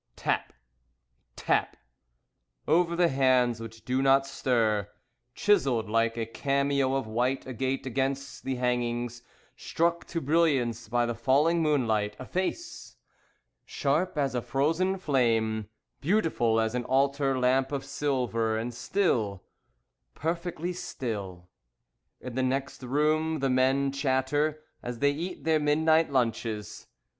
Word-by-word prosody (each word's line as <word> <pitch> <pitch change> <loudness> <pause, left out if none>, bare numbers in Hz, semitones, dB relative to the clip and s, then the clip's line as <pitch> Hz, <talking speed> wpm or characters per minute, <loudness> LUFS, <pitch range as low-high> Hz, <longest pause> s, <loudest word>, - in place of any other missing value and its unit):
Tap! - - -1 0.8
Tap! - - 0 0.9
Over 170 +2 +3
the 175 -1 +3
hands 130 -3 +2
which 115 0 -10
do 130 +1 0
not 135 0 +4
stir. 115 -7 0 0.5
Chiselled 135 - +2
like 115 +1 +1
a 115 - -1
cameo 140 +2 0
of 135 - -1
white 125 +5 -1
agate 130 +1 -2
against 135 +1 -2
the 135 -1 -2
hangings, 120 -1 -1 0.3
Struck 170 +1 -1
to 170 - -3
brilliance 135 -7 +1
by 120 0 +2
the 120 - -2
falling 140 +8 +2
moonlight, 115 -9 +1
A 130 - -8
face! 190 - -4 0.7
Sharp 150 +5 -1
as 140 -3 0
a 125 - -1
frozen 165 +10 0
flame, 115 - +1 0.3
Beautiful 150 - +1
as 110 0 0
an 125 0 -1
altar 135 0 +1
lamp 130 +2 +2
of 140 -2 -3
silver, 120 -6 -1
And 120 +2 -3
still. 120 - 0 0.7
Perfectly 170 +2 -3
still. 100 - -5 0.7
In 125 - -7
the 130 - -1
next 135 +2 -2
room, 155 +5 +1
the 135 -2 0
men 135 +2 +2
chatter 140 +3 0 0.2
As 120 0 -5
they 145 +4 +3
eat 170 +5 -5
their 160 -1 +2
midnight 155 +1 +3
lunches. 115 -4 -2
135 Hz, 125 wpm, -28 LUFS, 120-150 Hz, 0.9 s, not